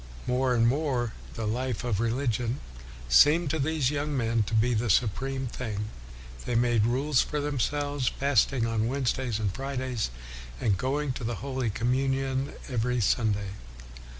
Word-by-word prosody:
More 125 0 +1
and 115 0 +4
more, 125 -4 0 0.2
the 115 - -3
life 120 +2 -2
of 115 -5 0
religion 120 +1 0 0.5
seemed 150 - +5
to 160 - -1
these 145 -2 +1
young 145 0 -1
men 115 -2 +1
to 115 - -1
be 120 +3 +3
the 115 +1 0
supreme 130 +6 +1
thing. 110 -4 -4 0.6
They 120 - 0
made 120 -2 +3
rules 135 +3 +2
for 150 - -2
themselves, 145 -1 -1
fasting 135 -3 +2
on 115 -1 0
Wednesdays 130 -3 -1
and 105 -4 -1
Fridays, 130 - -2 0.5
and 105 -4 +2
going 135 +6 -1
to 125 - -6
the 115 +1 -2
Holy 130 -4 -1
Communion 135 +4 0
every 125 -1 0
Sunday. 105 -2 +1
125 Hz, 150 wpm, -28 LUFS, 115-135 Hz, 0.6 s, seemed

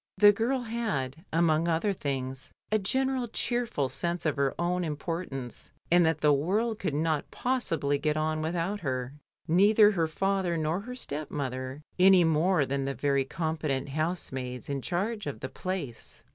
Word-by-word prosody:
The 205 +1 +8
girl 235 +6 0
had, 200 - -3
among 165 0 +3
other 170 +5 +1
things, 135 -5 -4 0.2
a 215 - +3
general 260 +4 0
cheerful 235 - -1
sense 170 +6 -3
of 155 - +1
her 140 -1 0
own 180 +1 0
importance, 150 -4 -5 0.2
and 175 0 +6
that 160 -1 0
the 150 -1 +5
world 205 +10 0
could 155 -7 -2
not 155 -1 0
possibly 165 - 0
get 150 +1 0
on 155 0 0
without 170 +5 -1
her 130 -4 -3 0.2
— - - -65
neither 205 +5 +6
her 170 -5 +1
father 190 +1 0
nor 160 +3 0
her 250 +5 -7
stepmother, 140 - -4 0.2
any 185 -1 +7
more 160 0 +3
than 135 0 -2
the 135 0 -2
very 140 +1 +1
competent 150 -3 -2
housemaids 135 -5 -3
in 140 -1 -2
charge 200 - -2
of 145 - -4
the 130 - -5
Place. 185 -11 -5
160 Hz, 160 wpm, -29 LUFS, 140-195 Hz, 0.2 s, The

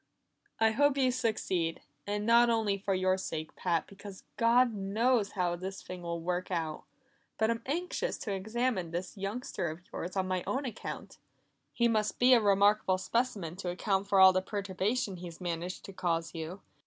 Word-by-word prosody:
"I 225 0 +4
hope 285 +4 +3
you 260 -2 +3
succeed; 190 -9 -1 0.3
and 205 0 -1
not 235 +1 +6
only 220 -3 +2
for 195 0 -1
your 185 0 +2
sake, 160 -4 -5
Pat, 170 -3 0
because 200 -1 -11
God 235 +1 +4
knows 210 +2 +1
how 180 -3 0
this 190 +2 -6
thing 180 -1 -7
will 170 -1 -3
work 180 +2 -2
out. 165 -4 -3 0.5
But 220 +1 +2
I'm 230 0 -2
anxious 360 - -2
to 205 - -2
examine 220 -1 -1
this 175 +5 -4
youngster 195 -3 -3
of 160 +3 -7
yours 180 +3 -5
on 190 -1 +1
my 185 -1 -1
own 270 +2 -1
account; 230 -4 -7 0.5
he 235 - +2
must 215 -2 0
be 255 +1 +6
a 240 - +6
remarkable 200 -1 +4
specimen 190 -3 -1
to 185 -2 -4
account 195 +2 0
for 195 -1 +3
all 190 0 +9
the 185 - +2
perturbation 200 +1 -2
he's 170 -1 -9
managed 175 0 -4
to 195 - -9
cause 165 -2 -1
you. 165 +4 -6
195 Hz, 180 wpm, -31 LUFS, 180-230 Hz, 0.5 s, all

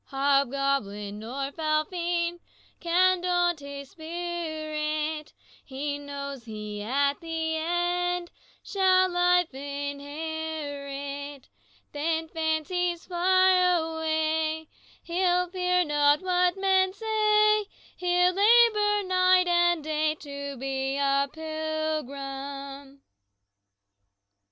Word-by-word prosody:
"Hobgoblin 275 -7 0
nor 270 +5 -4
foul 310 0 0
fiend 345 0 -2 0.4
Can 360 +1 +3
daunt 350 -2 +1
his 280 -1 -9
spirit; 315 -3 -3 0.3
He 285 +2 -4
knows 280 -3 -7
he 210 -2 -6
at 280 +6 +1
the 325 -1 -2
end 350 +1 -1 0.3
Shall 375 -1 +3
life 355 -2 +3
inherit. 285 0 -5 0.4
Then, 320 +2 -1
fancies 335 +2 -1
fly 370 +1 +3
away, 320 -2 0 0.3
He'll 360 +1 +1
fear 360 -1 +1
not 295 0 +3
what 360 0 +2
men 380 -1 +2
say; 425 0 +3 0.3
He'll 360 0 +2
labor 420 0 +4
night 365 0 +4
and 345 -2 +3
day 310 0 0
To 280 -2 -7
be 270 +1 -2
a 275 0 +2
pilgrim." 280 -3 -5
315 Hz, 90 wpm, -27 LUFS, 280-355 Hz, 0.4 s, labor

